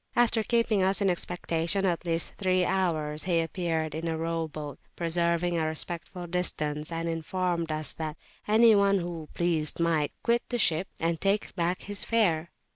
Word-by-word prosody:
After 240 -2 +3
keeping 230 -2 +2
us 190 +1 +3
in 195 -2 +3
expectation 175 +1 0
at 175 -1 -1
least 165 0 0
three 185 -2 +1
hours, 155 -5 0
he 175 -3 +2
appeared 165 -2 -1
in 160 +2 -3
a 160 -1 -1
row 165 0 -2
boat, 150 -2 -7 0.2
preserving 170 0 0
a 160 - 0
respectful 170 +3 -5
distance, 155 -3 -2
and 165 0 -2
informed 170 0 -1
us 155 -2 -2
that 155 -1 -5 0.3
any 220 +2 +6
one 200 -1 +4
who 170 -4 -5
pleased 165 -3 +1
might 165 -3 +1
quit 235 0 +3
the 245 - 0
ship 175 -4 +2
and 165 -1 -1
take 200 +2 0
back 175 0 0
his 205 0 -1
fare. 175 -8 +1
170 Hz, 170 wpm, -28 LUFS, 160-190 Hz, 0.3 s, any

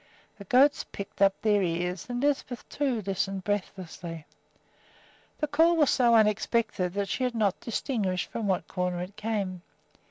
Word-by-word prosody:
The 200 - -9
goats 270 +8 +4
pricked 200 0 -9
up 195 -1 +4
their 210 -2 +3
ears, 180 0 -2
and 245 +1 -2
Lisbeth, 275 -4 -1
too, 260 -7 -1
listened 195 0 -2
breathlessly. 180 -5 -4 1.1
The - - 0
call 325 +4 +4
was 300 -4 +4
so 240 -3 +4
unexpected 215 -3 +2
that 200 0 -1
she 255 - -2
had 250 -1 -1
not 205 -4 +1
distinguished 210 -6 -2
from 225 -3 -3
what 185 -2 0
quarter 180 -1 -2
it 185 +3 -7
came. 200 -5 -3
205 Hz, 155 wpm, -28 LUFS, 185-245 Hz, 1.1 s, goats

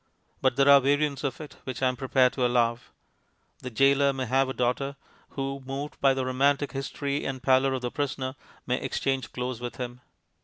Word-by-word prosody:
But - - +2
there 140 +1 +3
are 140 -1 +8
variants 145 +1 +1
of 135 -3 -2
it 150 -3 -10
which 130 0 -5
I - - +5
am 125 - 0
prepared 130 0 +2
to 130 - -1
allow. 120 -1 +2 0.8
The 125 - -6
goaler 140 +3 +4
may 130 -1 -3
have 130 +2 +2
a - - -2
daughter, 130 +3 -1 0.4
who, 135 0 -3
moved 135 +3 -6
by 135 -1 +4
the 130 -1 -1
romantic 140 +2 +1
history 140 +1 -3
and 130 -2 -4
pallor 130 0 +3
of 130 - -5
the 120 - -2
prisoner, 135 -2 -2 0.3
may 125 +1 -1
exchange 135 -2 -2
clothes 125 -1 -4
with 120 0 -5
him. 125 0 -6
135 Hz, 195 wpm, -27 LUFS, 125-140 Hz, 0.8 s, are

